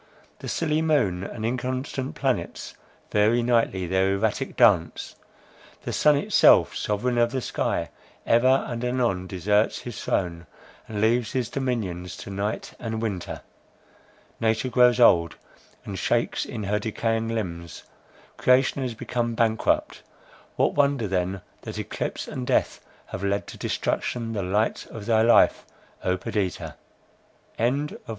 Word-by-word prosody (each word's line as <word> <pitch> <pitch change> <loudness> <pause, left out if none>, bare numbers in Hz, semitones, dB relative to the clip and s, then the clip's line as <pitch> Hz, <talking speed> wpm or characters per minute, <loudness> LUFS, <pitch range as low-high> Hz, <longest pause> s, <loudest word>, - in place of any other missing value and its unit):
The - - -8
silly 155 -1 0
moon 105 - +1
and 110 +2 -5
inconstant 130 +2 -3
planets - - -2 0.4
vary 110 +3 +3
nightly 115 -6 +1
their 95 +2 +1
erratic 110 +6 -1
dance; 100 -9 +3 0.7
the - - -4
sun 150 -1 +4
itself, 140 - +5
sovereign 120 +4 -1
of 120 0 +4
the 130 +2 -2
sky, - - -2 0.3
ever 130 +3 +4
and 120 0 -4
anon 120 -7 0
deserts 105 +4 +1
his 120 -4 -7
throne, 85 -3 -2 0.4
and 105 -2 -4
leaves 115 +1 +2
his 125 -3 -1
dominion 115 -10 -2
to 95 +1 -8
night 100 +2 -3
and 110 -1 -4
winter. 100 -6 -4 1.0
Nature 110 +3 +1
grows 125 0 +4
old, 85 -8 +5 0.5
and - - -5
shakes - - 0
in 110 -3 -6
her 105 +1 0
decaying 115 +1 -1
limbs,—creation 110 - -2
has 125 -3 -3
become 120 0 -2
bankrupt! 110 -1 +1 0.5
What - - +2
wonder 140 -6 +2
then, 95 0 -1 0.2
that - - -7
eclipse - - -4
and 65 - -5
death - - +1 0.3
have 90 - -6
led 100 +1 0
to - - -10
destruction 115 -2 -2
the 105 - -2
light 105 +4 0
of 105 -2 -8
thy 110 -1 +3
life, 115 +1 +5 0.4
O 90 0 +1
Perdita!" 95 0 -3 0.8
CHAPTER 140 +6 0
IX. - - -30
115 Hz, 135 wpm, -25 LUFS, 100-125 Hz, 1.0 s, itself